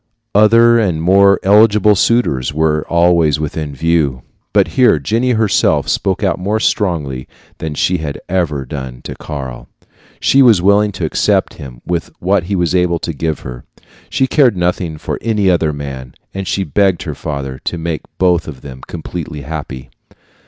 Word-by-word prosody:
Other 115 +3 +5
and 90 -8 0
more 100 +4 +4
eligible 105 +1 +5
suitors 95 - +1
were 75 0 0
always 85 -3 +3
within 75 -1 -4
view. 70 -4 0 0.3
But - - +2
here 120 +1 +3
Jenny 115 - 0
herself 110 -5 +1
spoke 95 +1 -1
out 95 -1 0
more 105 +4 -1
strongly 75 - -1 0.3
than 80 -2 -4
she 90 +5 +1
had 75 -3 -5
ever 85 -7 -1
done 65 -2 -7
to - - -6
Karl. 65 -5 -7 0.5
She 135 - +3
was 115 -7 +6
willing 100 +3 +3
to 85 -2 -3
accept 75 - +1
him 60 -4 -11
with 85 -1 -2
what 95 -1 0
he 100 +2 -2
was 85 -2 0
able 90 -2 +2
to 85 0 -4
give 80 0 -3
her. 60 -1 -8 0.5
She 135 - +1
cared 130 - +3
nothing 90 -2 -1
for - - -5
any 105 -4 +1
other 80 -3 +1
man, 70 -3 -7 0.2
and 95 -1 -5
she 100 - -1
begged 95 +2 +1
her - - -5
father 70 -4 -5
to 85 - -2
make 80 -1 -3 0.2
both 90 -3 +2
of 70 -5 -9
them 65 -2 -10
completely 80 -2 -6
happy. 70 -3 -7
85 Hz, 165 wpm, -15 LUFS, 75-100 Hz, 0.5 s, was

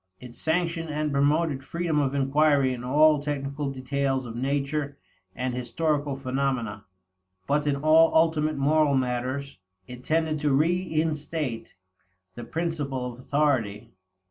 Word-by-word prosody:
It 125 -1 -11
sanctioned 165 +2 -1
and 150 0 -1
promoted 145 0 +1
freedom 170 +1 -1
of 140 -1 0
inquiry 140 -1 +3
in 125 -1 -7
all 150 +3 +4
technical 140 -1 -3
details 135 0 -2
of 115 -1 -7
natural 140 +3 -1 0.4
and 125 0 -2
historical 145 +3 -1
phenomena. 130 -6 -2 0.6
But 150 +4 0
in 145 - +2
all 155 +3 +5
ultimate 155 -2 +2
moral 145 +1 +3
matters, 130 0 -2 0.3
it 125 +3 -10
tended 160 0 0
to 145 -2 +1
reinstate 155 -4 -1 0.6
the 120 - -8
principle 140 -5 -3
of 120 - -15
authority. 120 -6 0
140 Hz, 125 wpm, -26 LUFS, 130-155 Hz, 0.6 s, all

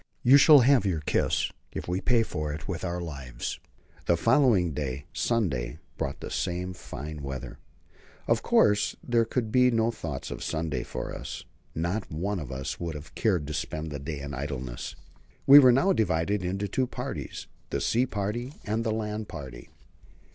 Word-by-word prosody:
You 130 +3 +8
shall 145 0 +8
have 130 -2 +5
your 90 -6 0
kiss, - - +1 0.2
if - - -6
we 90 +2 -1
pay 120 -2 +3
for 75 -8 -3
it 75 +1 -6
with 90 -4 -4
our 90 -1 -2
lives. 70 -8 -5 0.5
The 85 - +4
following 115 - +3
day 70 -1 -4
Sunday 75 - 0 0.2
brought - - -4
the - - -6
same 90 +1 -2
fine 75 -3 -7
weather. 70 -2 -6 0.7
Of - - +2
course, 105 0 +3
there 115 -1 +3
could 120 +1 -1
now 110 - -8
be 125 +1 +5
no 115 -1 +2
thought 80 - -6
of - - -6
Sunday 80 -1 -2
for - - -5
us. - - -7 0.3
Not 90 +5 -2
one 95 +5 -2
of 70 -5 -6
us 65 +1 -4
would 85 -2 -4
have 75 +1 -9
cared 90 -9 +1
to 75 - -5
spend 75 +1 -4
the 70 - -4
day 70 0 -5
in 70 0 -6
idleness. 65 -3 -5 0.5
We 140 +1 +11
were 130 -3 +8
now 180 +11 +4
divided 95 - +1
into 95 +3 -2
two 130 +6 0
parties: - - -5 0.2
the - - -1
sea 125 +3 +2
party 120 +6 -3
and 110 +2 -1
the 115 - -1
land 105 -1 -3
party. 65 -5 -9
90 Hz, 180 wpm, -28 LUFS, 75-115 Hz, 0.7 s, We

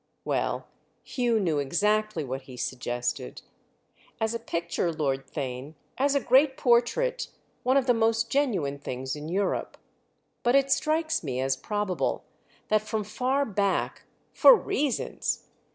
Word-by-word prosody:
Well, - - -1 0.4
Hugh 240 -3 +1
knew 165 -7 +1
exactly 210 +5 +1
what 135 0 -4
he 125 - -9
suggested. 120 - -3 0.8
"As 220 +1 0
a 230 - -2
picture, 170 -4 -2
Lord 140 -4 -1
Theign, 135 +2 -5 0.2
as 280 +2 +2
a - - +4
great 265 +2 +4
portrait, 260 - +2 0.3
one 260 +2 +3
of 270 - +2
the 250 - +4
most 225 0 +1
genuine 195 - 0
things 130 0 -4
in 150 +1 -7
Europe. 190 +2 -1 0.6
But 240 +2 +3
it 275 0 +3
strikes 315 - +1
me 130 -4 -3
as 135 +1 +1
probable 205 +6 -2 0.5
that 215 0 +3
from 215 0 -2
far 255 +7 0
back—for 205 - +3
reasons! 300 - -1
215 Hz, 135 wpm, -27 LUFS, -, 0.8 s, a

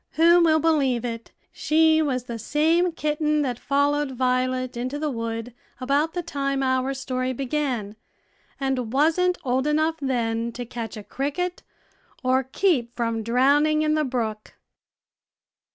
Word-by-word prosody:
Who 340 +2 +5
will 315 -2 +4
believe 275 -7 +1
it? 230 -1 -5 0.2
she 315 0 +3
was 260 -5 -1
the 235 -2 -6
same 325 - +2
kitten 300 -1 0
that 245 -3 -3
followed 285 0 +1
Violet 255 0 0
into 255 +4 -3
the 300 0 -2
wood 230 0 -4 0.3
about 285 +6 0
the 355 - -2
time 275 -4 -2
our 260 +1 0
story 255 -1 -2
began, 255 -5 -2 0.6
and 265 -4 -1
wasn't 330 +6 +2
old 260 +2 0
enough 310 +2 +1
then 235 -3 -1
to 245 +1 -6
catch 235 -1 -6
a 210 - -8
cricket 295 - -3 0.6
or 255 +1 +3
keep 260 -3 0
from 230 -2 -1
drowning 285 +7 +3
in 305 0 +2
the 310 0 +1
brook. 225 -5 -3
270 Hz, 140 wpm, -24 LUFS, 245-305 Hz, 0.6 s, Who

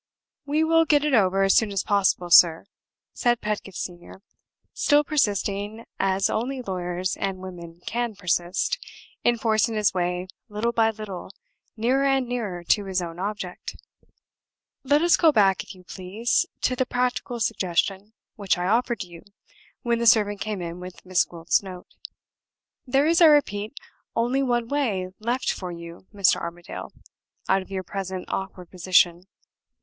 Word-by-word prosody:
"We 300 +2 +2
will 325 0 +4
get 295 -1 +3
it 300 - 0
over 195 -4 +3
as 195 - +4
soon 220 -2 +3
as 195 -2 -1
possible, 190 -3 +1
sir," 165 0 +7 0.5
said 240 -1 +1
Pedgift 210 -3 -4
Senior, 175 +2 -8 0.5
still 295 0 +3
persisting, 210 -6 -1
as 195 0 +2
only 260 +4 -2
lawyers 180 -2 -3
and 195 -1 -2
women 175 -2 -10
can 235 -1 -2
persist, 180 - -1 0.4
in 240 0 +3
forcing 225 0 +1
his 210 -2 +2
way 180 0 -1 0.2
little 215 +3 -1
by 225 -1 +3
little 210 -5 -7 0.5
nearer 255 +5 +2
and 270 -2 +2
nearer 215 -8 -4
to 205 +3 +2
his 190 -1 -1
own 170 -1 -6
object. 195 -2 -5 1.1
"Let 290 +4 +3
us 340 -2 +5
go 320 - +5
back, 195 -7 +3
if - - -11
you 185 - -16
please, 205 - -1
to 255 - +1
the 255 0 0
practical 245 -1 -1
suggestion 195 +1 -1 0.2
which 200 -4 0
I 175 - -2
offered 235 +3 +1
to 185 - -6
you 170 -1 -12 0.6
when 235 -1 +1
the 235 - +1
servant 205 -2 +4
came 210 -4 -3
in 170 +1 -6
with 180 +1 -10
Miss 185 -1 +2
Gwilt's 170 -1 0
note. 185 -2 -9 1.0
There 270 +3 +3
is, 330 +2 +3
I 330 - +9
repeat, 225 -6 +2 0.4
only 245 +4 +1
one 240 -3 0
way 225 -10 -1
left 240 +4 -1
for 180 -2 -5
you, 170 +1 -10
Mr. 200 -3 +3
Armadale, 170 +2 -7 0.6
out 190 0 +3
of 185 - -13
your 190 -1 -4
present 190 0 -5
awkward 190 -2 -5
position. 180 -1 +2
200 Hz, 160 wpm, -24 LUFS, 185-240 Hz, 1.1 s, I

